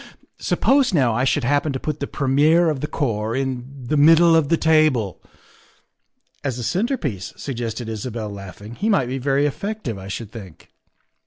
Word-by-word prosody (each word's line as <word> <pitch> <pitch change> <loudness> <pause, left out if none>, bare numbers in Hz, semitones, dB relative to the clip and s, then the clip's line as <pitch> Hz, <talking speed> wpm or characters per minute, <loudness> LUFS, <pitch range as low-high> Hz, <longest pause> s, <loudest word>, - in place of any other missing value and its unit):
Suppose, 265 -7 +2
now, 130 -6 +3
I 125 +4 +1
should 135 +1 +1
happen 145 +4 +1
to 130 - -3
put 155 +1 -4
the 140 - -3
premier 150 +5 +3
of 145 - -4
the 150 - -3
corps 115 -7 -2
in 130 0 -4
the 150 - +1
middle 165 +3 +6
of 155 -3 +2
the 165 - +3
table. 155 - +2 0.4
' - - -34
' - - -44
"As 135 -4 -2
a 120 - -4
centrepiece," 175 - -2
suggested 120 -3 -4
Isabel, 110 -1 -5
laughing, 100 +2 -9
" - - -22
he 215 - +1
might 195 - +3
be 135 +1 -3
very 140 +2 +1
effective, 145 - -3
I 95 - -9
should 105 +2 -6
think." 95 -8 -12
135 Hz, 185 wpm, -21 LUFS, 115-155 Hz, 0.4 s, middle